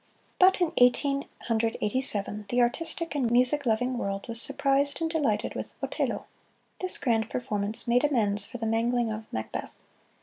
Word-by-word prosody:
But 375 0 +5
in 350 -3 0
Eighteen 275 +3 +2 0.2
Hundred 225 -1 -1
Eighty 210 +5 -1
seven, 210 -4 +3
the 245 - 0
artistic 325 +7 -1
and 265 -5 0
music 250 +3 +2
loving 245 +3 0
world 195 -2 -4
was 230 -1 +2
surprised 280 +1 +2
and 330 - -1
delighted 295 -10 -1
with - - -7
"Otello." - - -3 0.5
This 370 0 +1
grand 225 -4 0
performance 210 -3 0
made 245 +3 +2
amends 210 -8 +3
for 245 - -7
the 225 - -5
mangling 230 +1 0
of 215 0 -8
"Macbeth." 110 0 -6
245 Hz, 165 wpm, -27 LUFS, 220-280 Hz, 0.5 s, But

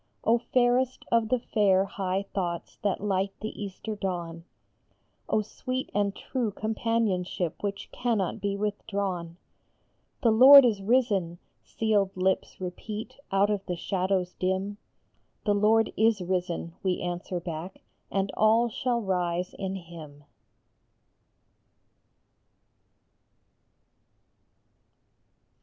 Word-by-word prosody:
Oh, 235 +1 +3
fairest 250 +1 +1
of 230 -2 +3
the 255 - +3
fair, 200 -5 +2
high 195 0 -2
thoughts 175 -3 -3
that 200 -2 0
light 195 -1 0
the 215 - -4
Easter 205 +2 -6
dawn! 170 -4 -4 0.8
Oh, 215 - +2
sweet 255 +5 -4
and 200 -1 0
true 250 -4 -2
companionship 210 -5 -1
which 200 -1 -4
cannot 225 -7 -1
be 200 -1 -1
with 205 0 -2
drawn! 185 -5 -3 0.4
" - - -44
The 230 - +5
Lord 265 +4 +10
is 215 -5 +1
risen! 200 -6 +1
" - - -45
sealed 205 -4 +1
lips 190 +2 0
repeat 210 +7 -6
out 195 +2 +3
of 200 -2 -1
the 180 - -1
shadows 185 0 -1
dim; 190 +2 -2 0.7
"The 205 - +3
Lord 215 +2 +3
is 220 -1 +3
risen," 180 -2 -2
we 185 -2 0
answer 175 0 -3
back, 170 +2 -7 0.3
"and 195 0 -1
all 225 +2 +4
shall 240 +1 -1
rise 180 -2 -1
in 190 -1 -4
him 160 -5 -10
200 Hz, 115 wpm, -27 LUFS, 180-220 Hz, 0.8 s, Lord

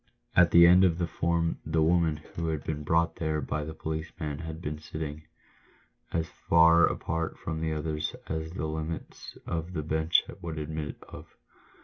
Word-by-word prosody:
At 90 -1 +6
the 85 0 +8
end 90 +2 +7
of 85 -3 +3
the 90 - 0
form 85 0 0
the 80 0 +1
woman 80 -2 +3 0.2
who 85 0 -3
had 80 -3 -2
been 75 -1 -3
brought 80 +2 +1
there 80 -1 -1
by 75 +1 -2
the 80 +1 -7
policeman 80 -1 -4
had 80 -1 -6
been 75 -3 -4
sitting 75 -1 -6 0.4
— - - -35
as 80 -1 -1 0.2
far 85 0 +7
apart 80 0 -2
from 80 -1 -4
the 80 -1 -1
others 75 0 -2
as 80 0 -3
the 80 - -3
limits 80 +1 -5
of 85 +1 -3
the 80 -3 -2
bench 80 +2 +2 0.2
would 80 -2 -5
admit 75 0 -4
of. - - -12
80 Hz, 175 wpm, -29 LUFS, 80-85 Hz, 0.4 s, the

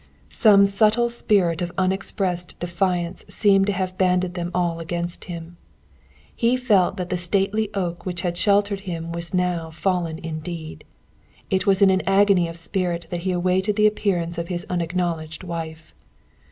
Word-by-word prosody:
Some 200 -3 +6
subtle 215 +4 +2
spirit 190 -7 +2
of 175 0 -2
unexpressed 185 -1 -1
defiance 175 0 -1
seemed 195 -2 +3
to 205 - +1
have 185 -1 -3
banded 180 -1 +2
them 175 -1 -3
all 175 -2 0
against 170 +1 -4
him. 170 -1 -8 0.8
He 240 +2 +2
felt 210 -8 +2
that 180 -1 -4
the 180 - +1
stately 200 +4 0
oak 175 -3 -2
which 180 -2 -4
had 175 -2 -2
sheltered 200 +1 +2
him 165 -1 -4
was 170 0 -2
now 180 -3 0
fallen 170 -1 -1
indeed. 160 0 -7 0.7
It 190 0 +1
was 195 0 +4
in 195 - +6
an 190 0 +2
agony 195 -2 +4
of 165 0 -6
spirit 175 -1 -2
that 175 - -2
he 185 +1 -1
awaited 185 +3 +1
the 210 0 +3
appearance 180 -5 0
of 170 - -4
his 175 -1 -4
unacknowledged 170 -2 -2
wife. 165 -2 -6
180 Hz, 160 wpm, -23 LUFS, 170-195 Hz, 0.8 s, Some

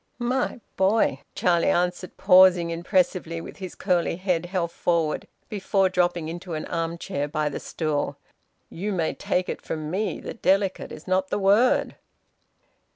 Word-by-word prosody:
"My 245 0 -1 0.2
boy," 195 +4 +2 0.2
Charlie 170 -1 +2
answered, 180 0 -1
pausing 185 -3 +6
impressively 175 -1 0
with - - -9
his 185 -2 -7
curly 180 -3 +1
head 180 -2 -1
held 175 -2 -2
forward, 165 -4 0 0.2
before 195 -2 +1
dropping 175 -3 0
into 170 +1 -6
an 155 - -4
arm 165 0 -2
chair 145 -3 -3
by 150 0 -1
the 140 - -5
stool, 155 -3 -2 0.5
"you 200 +5 -4
may 165 -4 0
take 180 0 -1
it - - -4
from 155 -1 -5
me 205 +4 -1
that - - -8
`delicate' 195 0 +1
is 155 - -10
not 190 +1 +1
the - - 0
word!" 205 +5 +3
180 Hz, 155 wpm, -25 LUFS, 165-190 Hz, 0.5 s, pausing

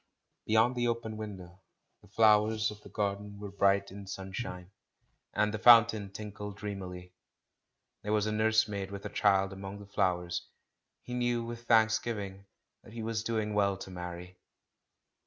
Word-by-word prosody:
Beyond 110 +3 +4
the 120 0 +1
open 115 -2 -2
window, 95 -4 -8 0.4
the - - -19
flowers 110 -1 +4
of 105 0 -11
the - - -13
garden 100 0 -3
were 100 -1 -7
bright 100 0 +2
in 100 0 -9
sunshine, 95 -1 -6 0.6
and 105 0 +1
the 105 - -3
fountain 115 -3 +6
tinkled 105 -1 -7
dreamily. 90 -3 -7 0.9
There 105 - -3
was 105 -1 +2
a 110 - -1
nurse 110 +1 +3
maid 100 -2 -4
with 100 0 -8
a - - -3
child 95 -1 +2
among 95 +1 -7
the 100 - -11
flowers; 90 -3 -1 0.6
he 125 - -7
knew 120 -1 0
with 120 0 -8
thanks 110 -1 +5
giving 100 -4 -5 0.4
that 110 - -14
he 115 -1 -5
was 110 0 -2
doing 110 -2 -1
well 100 -2 +2
to 95 - -9
marry. 90 0 -8
105 Hz, 160 wpm, -31 LUFS, 95-110 Hz, 0.9 s, fountain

